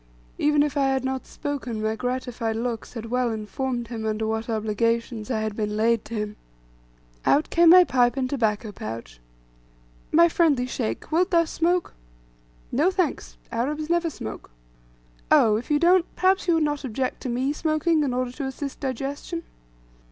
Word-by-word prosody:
Even 295 0 +4
if 295 0 -2
I 275 -1 +3
had 265 -1 0
not 265 0 -3
spoken, 270 -6 -4
my 220 0 0
gratified 245 -2 -2
looks 230 0 -3
had 230 -1 -7
well 250 -1 +1
informed 235 +2 -3
him, 230 -2 -5
under 220 0 -1
what 220 +1 -2
obligations 230 +1 -1
I 220 -4 0
had 215 -1 -3
been 210 -1 -2
laid 230 0 +2
to 230 - -6
him. 210 -1 -3 0.9
Out 295 - +2
came 340 0 +6
my 365 +2 +9
pipe 245 -5 +2
and 260 -1 0
tobacco 220 -5 -1
pouch. 110 - -7 0.9
"My 340 +2 +6
friendly 310 -7 +2
Sheikh, 115 - -4
wilt 355 +4 +2
thou 335 -2 +4
smoke?" 345 +2 0 0.8
"No, 300 +8 +3
thanks! 370 -4 -2
Arabs 300 +7 -2
never 345 -1 +2
smoke." 110 - -8 0.8
"Oh, 215 -2 +5
if 235 - -7
you 295 - +3
don't, 350 +2 +4
perhaps 375 0 +2
you 340 - +4
would 325 - +2
not 295 -1 -1
object 255 +1 -3
to 255 - -4
me 255 +4 0
smoking, 310 +1 +1
in 280 -3 0
order 250 0 -1
to 275 +2 -5
assist 270 +1 -5
digestion?" 280 +5 -4
255 Hz, 170 wpm, -25 LUFS, 225-300 Hz, 0.9 s, my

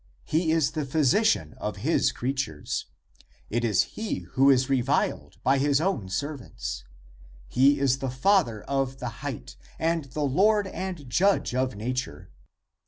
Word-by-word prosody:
He 160 +1 +1
is 160 -4 +2
the 155 - -2
Physician 140 - +2
of 105 - -3
his 165 - +3
creatures. 125 - -3 0.6
It 120 +2 0
is 105 -6 +3
he 220 0 -4
who 135 +1 +4
is 130 -1 +4
re 135 -2 +2
viled - - -1
by 135 +1 +3
his 140 0 +3
own 155 - -1
servants. 120 - -4 0.6
He 135 - +4
is 135 -1 +2
the 135 - -2
Father 130 - +2
of 135 -1 -1
the 125 -2 -4
height 140 -5 -6 0.2
and 165 -1 0
the 145 +3 -4
Lord 205 +9 +3
and 185 -6 -5
Judge 190 +5 +2
of 130 -2 0
nature. 115 - -4
135 Hz, 150 wpm, -26 LUFS, 125-160 Hz, 0.6 s, who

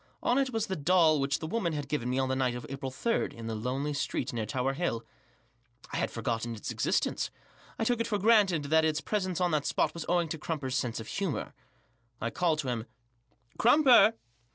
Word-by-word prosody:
On 245 +3 +3
it 270 -1 +1
was 225 -2 -1
the 190 - -3
doll 160 -1 +4
which 140 +1 +1
the - - -6
woman 175 -1 -1
had 145 -2 -4
given 125 -4 -2
me 130 - 0
on 135 0 +1
the 130 - 0
night 130 -2 0
of 125 - -6
April 135 0 -4
3» 230 - -1
in 115 - -9
the 115 - -3
lonely 130 +7 -2
street 135 -1 -2
near 110 -2 -2
Tower 130 +4 -1
Hill 130 -7 -2 0.9
I - - -1
had - - 0
forgotten 115 0 -3
its 105 - -5
existence, - - 0 0.5
I - - -1
took 240 +1 +1
it 230 - 0
for 210 - 0
granted 200 -7 +4
that 160 +2 +3
its 155 -1 +1
presence 185 -3 -2
on 180 -1 +2
that 150 -2 0
spot 155 - +1
was 170 - -6
owing 175 -1 +2
to 160 - -4
Crumper's 145 -5 -3
sense 125 -3 -1
of 110 - -8
humour. 190 -8 -3 0.7
I 115 - -2
called 170 -3 +1
to 135 - -4
him. 120 -1 -3 0.7
"Crumper!" 245 -2 +6
150 Hz, 215 wpm, -30 LUFS, 125-185 Hz, 0.9 s, Crumper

